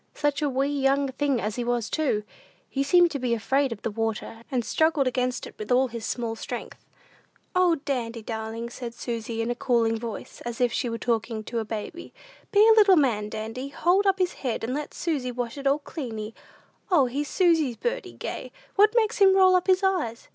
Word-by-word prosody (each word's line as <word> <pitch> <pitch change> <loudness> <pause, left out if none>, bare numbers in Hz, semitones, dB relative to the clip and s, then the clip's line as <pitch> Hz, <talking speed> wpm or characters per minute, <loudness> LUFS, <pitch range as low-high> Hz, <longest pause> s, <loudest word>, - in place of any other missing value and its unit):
Such 290 0 0
a 295 - +1
wee 270 +1 0
young 275 -1 +1
thing 275 -1 0
as 215 +1 -3
he 245 - -1
was 240 -2 -1
too! 265 -9 0 0.4
He 275 - -2
seemed 350 +4 +5
to 280 - -3
be 245 -2 0
afraid 265 +4 +1
of 220 -2 -7
the 225 - -1
water, 225 +1 -3
and 250 -5 -1
struggled 315 -3 +2
against 255 0 -1
it - - -10
with 215 +1 -5
all 255 +1 +4
his 230 -1 -5
small 230 -2 -2
strength. - - -7 0.7
"O, 365 -2 +4
Dandy, 245 -6 -3
darling," 225 +1 -5
said 240 -1 -7
Susy, 230 -1 -3
in 235 - -1
a - - +1
cooing 235 -4 +1
voice, 225 -2 -7
as 240 -1 -5
if 245 -1 +2
she 245 - -1
were 230 - -3
talking 225 -1 -1
to 235 +2 -3
a 220 - -3
baby; 225 +11 -6 0.4
"be 420 +1 +6
a 450 - +8
little 410 -3 +7
man, 220 -8 +1
Dandy; 225 +5 -5
hold 365 +7 +2
up 390 0 +3
his 365 -2 0
head, 250 -5 -2
and 240 +3 -2
let 295 +1 -4
Susy 290 -7 -2
wash 240 -1 -4
it 280 -1 -3
all 275 +1 +4
cleany! 230 -8 -6 0.6
O, 330 -8 +5
he's 280 +4 -2
Susie's 325 -9 +2
birdie - - -3
gay! - - -6 0.3
What 425 +3 +5
makes 450 -2 +2
him 385 -1 +6
roll 375 -1 +6
up 365 +1 +1
his 375 +1 +3
eyes?" 345 -13 -1
255 Hz, 210 wpm, -26 LUFS, 230-315 Hz, 0.7 s, a